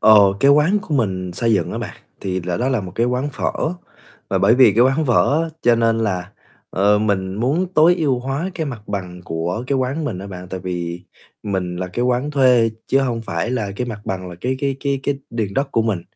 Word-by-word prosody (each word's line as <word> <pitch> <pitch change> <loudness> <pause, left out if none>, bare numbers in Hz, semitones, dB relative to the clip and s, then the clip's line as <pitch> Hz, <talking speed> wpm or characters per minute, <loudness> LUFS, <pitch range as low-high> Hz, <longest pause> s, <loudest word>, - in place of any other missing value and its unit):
Ờ, 110 - +7 0.3
cái 140 - +6
quán 150 +8 +4
của 165 -6 -4
mình 95 -8 -1
xây 115 +5 +1
dựng 90 -4 +1
á - - -3
bạn - - -6 0.2
thì 95 -1 -2
là 90 0 -2
đó 125 - 0
là 130 -5 +1
một 90 -2 -7
cái 115 +2 +1
quán 125 +4 -1
phở, - - -1 0.8
và 95 - +1
bởi 100 +4 +5
vì 125 -4 +6
cái 115 - +3
quán 135 +4 +2
phở 140 +6 +3
á, 165 - -2
cho 120 -1 +5
nên 115 -1 +2
là, 95 -4 -2 0.4
ờ, 100 +2 +3
mình 95 -3 0
muốn 135 - 0
tối 165 +3 +6
ưu 140 -7 +1
hóa 135 +8 -3
cái 160 -2 -2
mặt 120 -7 -6
bằng 90 -3 -5
của 85 +8 -3
cái 140 +1 +1
quán 135 +5 -1
mình 110 -11 -3
á 100 - -7
bạn. 90 -2 -8
Tại 95 -1 -5
vì 90 -1 -4 0.4
mình 95 -4 -2
là 90 - -3
cái 120 +7 -2
quán 125 +3 0
thuê 125 -5 +4 0.2
chứ 135 - +3
hông 120 -4 -1
phải 115 - -2
là 110 -6 -1
cái 125 - -2
mặt 110 -4 -6
bằng 95 -1 -4
là - - -8
cái 130 +1 -1
cái 135 -1 0
cái 140 -1 -1
cái 140 0 -1
điền 110 -4 -3
đất 135 +1 0
của 115 - +3
mình, 105 -6 -1
115 Hz, 240 wpm, -20 LUFS, 95-135 Hz, 0.8 s, Ờ